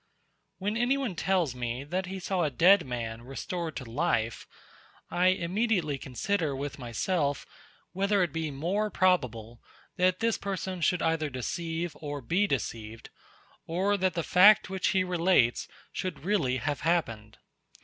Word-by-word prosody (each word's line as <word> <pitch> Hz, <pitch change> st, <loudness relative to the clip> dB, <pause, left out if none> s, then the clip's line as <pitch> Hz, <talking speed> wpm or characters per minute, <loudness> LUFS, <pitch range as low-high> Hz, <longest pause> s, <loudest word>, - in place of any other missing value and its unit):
When 205 Hz, +3 st, -2 dB
anyone 250 Hz, -2 st, +1 dB
tells 175 Hz, -5 st, 0 dB
me, 125 Hz, +1 st, -4 dB
that 180 Hz, +5 st, -3 dB
he 190 Hz, +1 st, -5 dB
saw 185 Hz, 0 st, -1 dB
a 155 Hz, -, +2 dB
dead 175 Hz, +5 st, +5 dB
man 115 Hz, -2 st, -4 dB
restored 160 Hz, -, -5 dB
to 135 Hz, -, -5 dB
life, 115 Hz, -3 st, -1 dB, 0.6 s
I 180 Hz, +1 st, +3 dB
immediately 185 Hz, -4 st, +1 dB
consider 150 Hz, +4 st, -1 dB
with 140 Hz, +1 st, -5 dB
myself, 140 Hz, -, -1 dB, 0.5 s
whether 195 Hz, +1 st, +2 dB
it 170 Hz, -5 st, -2 dB
be 160 Hz, -1 st, -2 dB
more 180 Hz, +10 st, -1 dB
probable, 125 Hz, -, 0 dB, 0.4 s
that 185 Hz, 0 st, +2 dB
this 230 Hz, 0 st, +1 dB
person 190 Hz, -2 st, -4 dB
should 180 Hz, +1 st, +2 dB
either 160 Hz, -2 st, +1 dB
deceive 165 Hz, +5 st, -3 dB
or 145 Hz, -1 st, -5 dB
be 180 Hz, -, +1 dB
deceived, 115 Hz, -, -4 dB, 0.6 s
or 190 Hz, +5 st, +1 dB
that 185 Hz, -3 st, 0 dB
the 170 Hz, -, -1 dB
fact, 200 Hz, +4 st, +6 dB
which 190 Hz, -1 st, 0 dB
he 190 Hz, -2 st, +2 dB
relates, 175 Hz, -9 st, +2 dB, 0.3 s
should 185 Hz, -2 st, -4 dB
really 160 Hz, -11 st, +1 dB
have 145 Hz, +4 st, -2 dB
happened. 115 Hz, -11 st, -1 dB
170 Hz, 145 wpm, -29 LUFS, 135-190 Hz, 0.6 s, fact